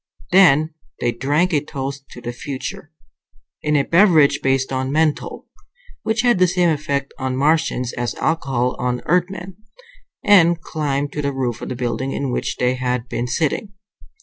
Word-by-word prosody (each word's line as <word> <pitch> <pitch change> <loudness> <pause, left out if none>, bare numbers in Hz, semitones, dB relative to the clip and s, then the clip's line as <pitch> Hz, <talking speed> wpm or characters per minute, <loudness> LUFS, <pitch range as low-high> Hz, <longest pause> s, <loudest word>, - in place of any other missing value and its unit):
Then 160 -4 +5 0.3
they 120 - +1
drank 145 +9 0
a 145 -1 +2
toast 135 -1 -6
to 120 - -11
the 120 0 -5
future 140 +4 -6 0.7
in 150 0 0
a 140 - +3
beverage 160 -6 +4
based 135 0 +1
on 130 0 -1
menthol, 155 0 0 0.6
which 220 0 0
had 240 -5 +3
the 185 - +5
same 175 0 +2
effect 140 -2 -2
on 130 -1 -2
Martians 145 -4 +1
as 120 0 -3
alcohol 135 -6 0
on 125 0 -1
Earthmen 180 +1 -1 0.7
and 175 -4 +6
climbed 145 -3 -2
to 150 - -3
the 140 -1 -1
roof 125 -3 -3
of - - -5
the - - -3
building 125 +2 -2
in 140 -2 -2
which - - -2
they 125 0 +1
had 125 -1 -2
been 120 +1 -2
sitting. 160 +9 -1
140 Hz, 165 wpm, -20 LUFS, 130-165 Hz, 0.7 s, and